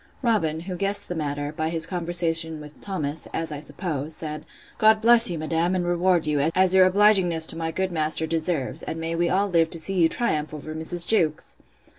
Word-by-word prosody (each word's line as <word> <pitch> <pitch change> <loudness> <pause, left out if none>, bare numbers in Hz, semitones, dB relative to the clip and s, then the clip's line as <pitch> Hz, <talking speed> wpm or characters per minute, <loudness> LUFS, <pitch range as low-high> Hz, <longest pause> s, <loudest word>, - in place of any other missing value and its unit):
Robin, 165 -10 0
who 180 +1 -7
guessed 200 +2 -1
the - - -5
matter, 145 -2 -4
by 155 +1 -2
his 165 -1 +2
conversation 165 -2 +1
with 150 0 -14
Thomas, 160 -6 -4
(as 165 -1 -3
I 150 - -6
suppose,) 150 -1 -3
said, 155 -1 -5 0.3
God 215 0 +4
bless 235 0 +7
you, 170 - -4
madam, 165 +3 -1
and 180 -1 -2
reward 175 -1 +1
you, 150 0 0
as 185 0 +3
your 185 -1 +5
obligingness 190 -5 +3
to - - -1
my 165 0 -4
good 190 +3 -3
master 160 -1 -1
deserves; 160 -4 -2
and 160 - -6
may 165 +1 -4
we 170 +1 -1
all 200 +2 0
live 165 -4 +1
to 165 - -2
see 195 +4 +1
you 170 -3 +2
triumph 155 -11 -2
over 155 +1 -8
Mrs. 170 +2 -1
Jewkes! 160 -9 +1
165 Hz, 205 wpm, -23 LUFS, 155-185 Hz, 0.3 s, bless